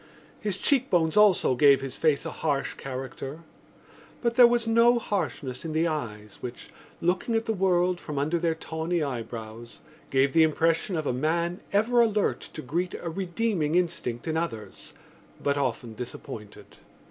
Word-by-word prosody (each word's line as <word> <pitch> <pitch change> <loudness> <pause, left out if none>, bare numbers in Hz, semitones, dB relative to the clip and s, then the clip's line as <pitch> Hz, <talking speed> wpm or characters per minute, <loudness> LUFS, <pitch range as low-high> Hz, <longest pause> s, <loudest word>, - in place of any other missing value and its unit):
His 205 -3 -2
cheekbones 185 - +2
also 210 -9 +5
gave 140 +1 +5
his 135 -1 -5
face 155 -3 +1
a - - -3
harsh 145 -3 -1
character; 135 +3 -6 0.8
but 235 -1 +2
there 245 0 +8
was 240 -1 +1
no 230 +2 +5
harshness 150 - -3
in 160 -2 -4
the 160 +2 +2
eyes 105 -10 -5
which, 125 0 -7 0.3
looking 180 +7 0
at 225 0 0
the 225 - 0
world 180 -2 +2
from 150 -4 -6
under 155 +5 +1
their 165 -1 0
tawny 160 +1 -2
eyebrows, 115 -3 -6 0.3
gave 135 0 +2
the 165 - +5
impression 165 +4 +2
of 155 -2 -2
a 125 - 0
man 170 +6 -1
ever 230 +4 +3
alert 215 -3 +2 0.2
to 155 - -6
greet 175 +7 -2
a 170 - -5
redeeming 180 -3 -1
instinct 165 -9 -1
in 160 0 0
others 115 - -5 0.5
but 140 0 0
often 125 -4 -2
disappointed. 110 -2 -9
160 Hz, 160 wpm, -27 LUFS, 135-185 Hz, 0.8 s, there